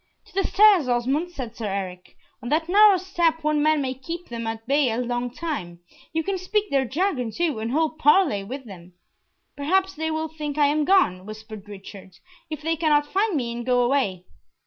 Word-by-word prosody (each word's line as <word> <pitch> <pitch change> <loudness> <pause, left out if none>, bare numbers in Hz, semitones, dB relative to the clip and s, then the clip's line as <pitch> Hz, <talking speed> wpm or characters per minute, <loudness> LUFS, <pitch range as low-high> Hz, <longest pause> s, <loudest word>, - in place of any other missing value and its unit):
"To - - -21
the 390 +1 0
stairs, 400 -8 +5
Osmond," 260 +8 0
said 255 -10 -7
Sir 220 - -4
Eric. 185 -2 -5 0.3
"On 240 - -6
that 320 +3 +1
narrow 405 +1 +6
step 340 -3 0
one 305 -1 +1
man 305 -1 +2
may 260 -1 -2
keep 330 +7 -7
them 230 -1 -5
at 225 0 -5
bay 280 -1 +3
a 225 - -2
long 245 0 -2
time. 235 - -5 0.3
You 325 0 -1
can 390 0 -2
speak 410 +3 -1
their 270 -1 +2
jargon 275 - -1
too, 310 0 -1
and 225 +1 -3
hold 310 +2 0
parley 295 - +4
with 260 +6 -7
them." 180 -4 -12 0.6
"Perhaps 375 +7 +1
they 320 +1 -3
will 315 0 -2
think 300 -2 -6
I 295 - +4
am 295 +1 +1
gone," 205 - +2
whispered 215 -1 -10
Richard, 195 -1 -11 0.4
"if 310 -1 -6
they 325 +1 0
cannot 300 -2 +2
find 400 0 +1
me, 240 -3 -2
and 240 0 -5
go 250 0 +2
away." 240 -9 0
285 Hz, 200 wpm, -24 LUFS, 230-330 Hz, 0.6 s, narrow